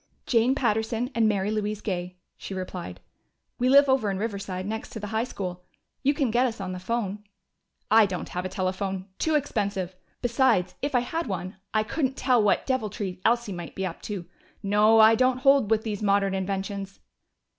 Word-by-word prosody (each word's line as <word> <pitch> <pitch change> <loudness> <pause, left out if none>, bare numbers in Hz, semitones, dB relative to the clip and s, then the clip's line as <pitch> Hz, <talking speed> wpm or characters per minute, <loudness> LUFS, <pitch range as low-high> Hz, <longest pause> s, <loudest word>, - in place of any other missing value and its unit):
"Jane 240 +2 +3
Patterson 230 0 0
and 225 -2 +3
Mary 200 0 0
Louise 210 -1 -2
Gay," 180 -3 -4 0.2
she 195 - -7
replied. 180 - -6 0.6
"We 250 +1 +2
live 280 +1 +7
over 265 -6 +2
in 195 - -2
Riverside, 195 -3 -4
next 220 +2 -4
to 220 - -5
the 210 - -5
high 220 +2 +1
school. 180 -6 -6 0.4
You 280 +2 +2
can 275 -7 +1
get 245 +3 +3
us 230 -2 -5
on 190 -2 -4
the 185 - -5
phone." 210 0 -3 0.7
"I 220 -1 +7
haven't 180 -2 -5
a 180 +1 -2
telephone. 190 0 -3
Too 315 -1 +1
expensive. 200 -10 -1 0.3
Besides, 240 -7 +2
if 285 -1 -1
I 245 - +4
had 325 +6 -3
one, 185 -1 -4
I 215 -1 +2
couldn't 265 +3 -2
tell 250 -3 +3
what 205 -2 +2
deviltry 210 -7 -2
Elsie 235 -3 +2
might 175 -2 -7
be 190 - -2
up 175 -2 -5
to.... 195 -4 -4 0.4
No, 210 +2 +5
I 220 +1 +8
don't 255 +2 +3
hold 270 -4 +4
with 220 -1 +2
these 210 -2 -4
modern 200 -1 +2
inventions." 195 0 -3
210 Hz, 185 wpm, -26 LUFS, 190-240 Hz, 0.7 s, I